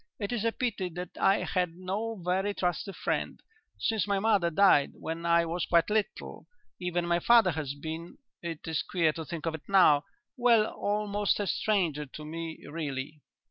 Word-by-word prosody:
"It 205 0 -4
is 235 -3 -1
a 230 - +2
pity 225 -7 -2
that 180 -1 -6
I 195 +1 +3
had 180 -3 -1
no 200 +5 -3
very 190 +3 0
trusty 180 +2 -1
friend, - - -2 0.4
since 220 -3 0
my 200 -1 +1
mother 200 -4 +2
died 170 -5 +4
when 165 +1 -5
I 170 0 +4
was 170 +1 -2
quite 170 +4 +3
little. 215 -1 -2 0.3
Even 175 -1 -1
my 170 0 +2
father 230 -1 +5
has 145 -3 -4
been 160 +3 -7 0.2
it 165 -2 -6
is 160 -1 0
queer 165 -4 +1
to 160 - -5
think 160 +2 -6
of 165 - -1
it 160 +2 -9
now 165 -7 +5 0.3
well, 235 -3 +5
almost 205 -1 -1
a 205 - 0
stranger 170 -8 0
to 150 +3 -9
me 165 +1 -6
really." 145 -1 -5
180 Hz, 180 wpm, -29 LUFS, 160-205 Hz, 0.4 s, father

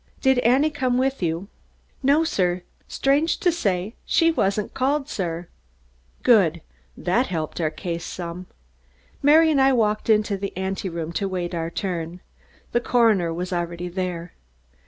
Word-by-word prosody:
"Did 265 -2 +3
Annie 260 +6 +3
come 255 -4 0
with 265 -1 0
you?" 170 +2 -1 0.5
"No, 285 +4 +4
sir. 180 - 0 0.2
Strange 285 +4 +1
to 355 - +2
say 200 - -1
she 330 0 +3
wasn't 200 -8 0
called, 275 +2 0
sir." 175 - -3 0.8
Good! 180 -9 +4 0.4
That 235 +9 +1
helped 160 -1 -3
our 155 - +1
case 170 +1 -5
some. 175 +1 -6 0.7
Mary 315 +3 +6
and 280 -3 +3
I 270 0 +5
walked 215 -2 +1
into 210 -2 +3
the 195 -1 -5
anteroom 185 -4 -3
to 195 +4 -2
await 180 -2 -3
our 165 -1 -2
turn. 175 -2 -4 0.5
The 240 - +1
coroner 220 -9 +3
was 180 +2 -4
already 175 0 -3
there. 175 -2 -4
195 Hz, 145 wpm, -23 LUFS, 175-260 Hz, 0.8 s, Mary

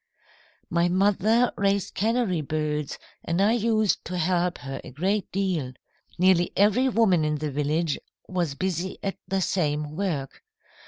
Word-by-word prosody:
"My 170 +1 +2
mother 205 +6 +3
raised 200 -1 +1
canary 220 -5 +1
birds, 150 0 -2 0.3
and 165 +2 -1
I 205 +3 +4
used 220 -3 +1
to 180 - -4
help 175 +1 +1
her 135 -1 -6
a - - -9
great 190 +9 -1
deal. 180 -9 -1 0.4
Nearly 180 -1 +4
every 215 +6 +4
woman 210 -9 +3
in 150 0 0
the 150 0 -3
village 150 +2 0 0.3
was 175 -6 -1
busy 185 +1 -2
at 195 - -3
the 195 0 0
same 150 -4 -1
work. 160 -8 -3
180 Hz, 145 wpm, -26 LUFS, 155-200 Hz, 0.4 s, I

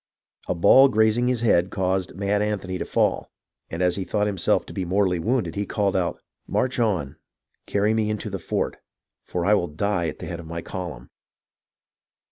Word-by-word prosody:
A - - 0
ball 100 +10 +7
grazing 110 0 +2
his 125 -2 0
head 95 -6 +3
caused 95 -1 -1
Mad 100 +1 0
Anthony 100 -3 -2
to - - -3
fall, - - 0 0.4
and 85 +2 -2
as 90 0 +2
he 95 - -2
thought 105 +2 0
himself 95 -4 +1
to - - -10
be 95 - -2
mortally 90 0 +1
wounded, 105 -2 0
he 100 +1 -3
called 100 -2 0
out: 90 -2 -1 0.2
" - - -50
March 130 0 0
on! 85 - 0 0.5
Carry 105 +2 +1
me 110 -1 +1
into 105 0 -3
the 95 - -3
fort, 80 - -2 0.5
for 90 -1 -3
I 105 - +4
will 90 -4 +2
die 85 +2 -1
at 75 - -5
the - - -7
head 85 - -5
of 85 - -9
my 85 0 -5
column 85 -10 -7
95 Hz, 195 wpm, -24 LUFS, 85-105 Hz, 0.5 s, ball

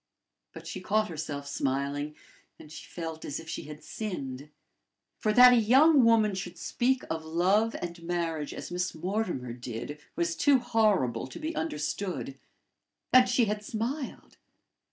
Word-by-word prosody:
But - - -11
she - - -6
caught 215 +1 +1
herself 150 -3 -5
smiling, 140 +2 -2 0.4
and 150 - -14
she - - -10
felt 165 -2 -6
as 145 - -4
if 160 - -11
she - - -5
had 150 0 -10
sinned. 145 - -5 0.7
For 215 - +1
that 250 +3 +9
a - - +5
young 265 +6 +6
woman 225 -3 +4
should 180 -2 -5
speak 255 +8 0
of 160 0 -3
love 185 +8 +2
and 170 -1 -6
marriage 165 -3 -2
as - - -7
Miss 180 0 -2
Mortimer 175 - -2
did, 120 +4 -6 0.2
was 170 -1 0
too 280 +10 +4
horrible 215 - +1
to - - -10
be 320 0 -4
understood 150 -1 -3 0.7
and 255 0 +7
she 245 -1 +3
had 210 0 -2
smiled! 240 +7 -4
175 Hz, 155 wpm, -29 LUFS, 150-225 Hz, 0.7 s, that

